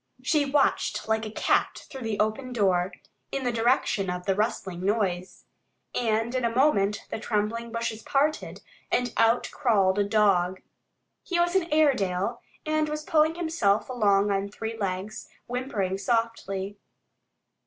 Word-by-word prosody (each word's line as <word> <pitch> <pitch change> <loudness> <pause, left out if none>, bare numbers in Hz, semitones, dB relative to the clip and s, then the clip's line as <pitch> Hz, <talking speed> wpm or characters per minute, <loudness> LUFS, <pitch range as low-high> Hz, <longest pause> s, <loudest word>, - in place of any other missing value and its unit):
She 295 +1 +2
watched 280 -5 +1
like 220 0 0
a - - -7
cat - - 0
through 265 - -9
the 225 -3 -3
open 220 +4 -1
door, 190 -4 +2 0.4
in 275 - -2
the 245 - +1
direction 225 -4 +1
of 180 0 -4
the 195 - +2
rustling 190 -4 -2
noise. 190 -3 -1 0.5
And 225 0 0
in 255 -1 -1
a 235 - +2
moment 230 -5 +2
the - - -3
trembling 225 +2 -2
bushes 230 -1 -3
parted, 290 +6 -1 0.3
and 245 -2 +1
out 230 +2 +3
crawled 205 -8 +2
a - - +4
dog. 195 -3 +2 0.6
He 350 -1 -2
was 345 +1 +2
an 345 -4 +1
Airedale 235 -8 +2 0.2
and 310 0 +1
was 305 0 -3
pulling 315 +1 +3
himself 230 -12 +1
along 205 -4 +2
on 200 0 -1
three 220 +2 -5
legs, 195 0 -4 0.2
whimpering 230 -7 -2
softly. 205 -3 -2
225 Hz, 145 wpm, -26 LUFS, 200-255 Hz, 0.6 s, a